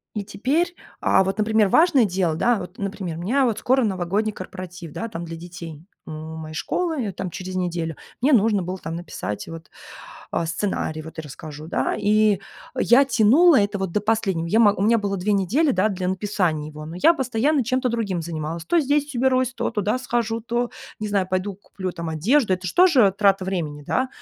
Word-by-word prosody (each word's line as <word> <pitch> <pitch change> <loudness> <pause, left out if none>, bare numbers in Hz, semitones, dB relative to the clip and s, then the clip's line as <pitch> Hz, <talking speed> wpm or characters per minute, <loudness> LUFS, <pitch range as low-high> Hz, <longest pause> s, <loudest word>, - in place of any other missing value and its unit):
и 205 - -2
теперь 310 - 0 0.3
а 190 - +4
вот, 195 +1 -2
например, 215 -1 +3
важное 310 - +5
дело, 180 -4 0
да, 240 +6 +2
вот, 180 +1 -9
например, 195 -4 -4
у - - -6
меня 260 +8 +2
вот 225 -4 0
скоро 260 0 +2
новогодний 200 +2 -1
корпоратив, 180 -3 -8
да, 230 - -4
там 170 -4 -6
для 165 0 -7
детей 170 -2 -9 0.2
у - - -7
моей 155 0 -7
школы, 335 - -1
её 200 -4 -3
там 185 -1 -4
через 185 +1 -7
неделю, 170 -3 -2 0.3
мне 280 +2 +4
нужно 210 -4 +3
было 185 +2 -4
там 165 +1 -5
написать 105 - -5
вот, 165 -1 -9 0.6
а, 170 - 0
сценарий, 165 -2 -2
вот 160 +1 -11
я - - -3
расскажу, 150 +2 -9
да, - - 0
и 210 -1 +3 0.4
я 255 +4 +5
тянула 270 +5 +5
это 200 0 0
вот 190 -3 -3
до 210 - +1
последнего. 200 -6 0
Я 215 +7 +2
мо 205 -3 +6
у 195 - -3
меня 230 +2 +4
было 200 -1 -2
2 200 +3 0
недели, 230 - +2
да, 190 +3 +2
для 185 -2 -2
написания 180 -6 -1
его, 150 0 -9
но 165 +2 -7
я 335 - +6
постоянно 265 +2 +1
чем-то 255 +1 0
другим 200 -7 -2
занималась. 165 0 -5
То 340 - +3
здесь 290 0 0
уберусь, 255 0 +2
то - - -2
туда 210 +2 0
схожу, 230 -2 -1
то, 240 +1 -2 0.3
не 215 - -2
знаю, 195 -2 0
пойду 185 +1 -1
куплю 185 -2 -6
там 170 -2 -5
одежду. 205 - +2
Это 185 0 -7
ж - - -3
тоже 270 - +5
трата 195 -2 +3
времени, 155 -6 -3
да, 260 0 0
200 Hz, 205 wpm, -23 LUFS, 170-235 Hz, 0.6 s, мо